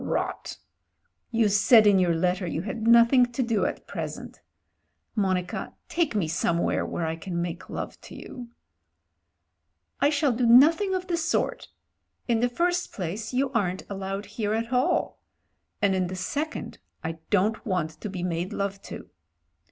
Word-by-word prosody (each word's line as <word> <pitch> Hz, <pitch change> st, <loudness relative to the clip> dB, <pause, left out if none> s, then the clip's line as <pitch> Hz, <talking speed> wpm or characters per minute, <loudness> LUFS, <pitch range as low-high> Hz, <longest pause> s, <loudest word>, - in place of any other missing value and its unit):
"Rot! -, -, -3 dB, 0.7 s
You 230 Hz, -2 st, +2 dB
said 215 Hz, +2 st, +6 dB
in 200 Hz, -2 st, +6 dB
your 175 Hz, -2 st, +2 dB
letter 180 Hz, +2 st, 0 dB
you 165 Hz, +1 st, -3 dB
had 220 Hz, +2 st, -4 dB
nothing 235 Hz, +2 st, +6 dB
to 255 Hz, -, 0 dB
do 230 Hz, -3 st, +1 dB
at -, -, -6 dB
present. -, -, -6 dB, 0.7 s
Monica, 185 Hz, -4 st, -1 dB
take 330 Hz, -8 st, 0 dB
me 190 Hz, -6 st, +1 dB
somewhere 170 Hz, +1 st, 0 dB
where 170 Hz, -, -3 dB
I 160 Hz, 0 st, -2 dB
can 170 Hz, +1 st, -5 dB
make 170 Hz, 0 st, -4 dB
love -, -, -6 dB
to -, -, -12 dB
you." 245 Hz, -2 st, -9 dB, 1.5 s
"I 285 Hz, -, +4 dB
shall 290 Hz, -2 st, +2 dB
do 240 Hz, 0 st, +1 dB
nothing 320 Hz, -, +6 dB
of 370 Hz, 0 st, -3 dB
the 350 Hz, -2 st, -1 dB
sort. 350 Hz, +9 st, -1 dB, 0.6 s
In 235 Hz, -2 st, +2 dB
the 245 Hz, +1 st, +2 dB
first 350 Hz, +7 st, 0 dB
place 200 Hz, +4 st, -4 dB
you 260 Hz, +1 st, 0 dB
aren't 190 Hz, -7 st, -1 dB
allowed 195 Hz, +1 st, -4 dB
here 210 Hz, +1 st, -2 dB
at 230 Hz, +2 st, -3 dB
all; 250 Hz, +1 st, +1 dB, 0.6 s
and 200 Hz, -1 st, +4 dB
in 185 Hz, -1 st, 0 dB
the 185 Hz, -, -5 dB
second 290 Hz, +12 st, -4 dB, 0.2 s
I 160 Hz, 0 st, -4 dB
don't 210 Hz, +2 st, +1 dB
want 180 Hz, -8 st, -1 dB
to 210 Hz, -, -4 dB
be 185 Hz, -2 st, -5 dB
made 175 Hz, 0 st, -2 dB
love 200 Hz, 0 st, -3 dB
to." -, -, -8 dB
210 Hz, 160 wpm, -26 LUFS, 185-250 Hz, 1.5 s, said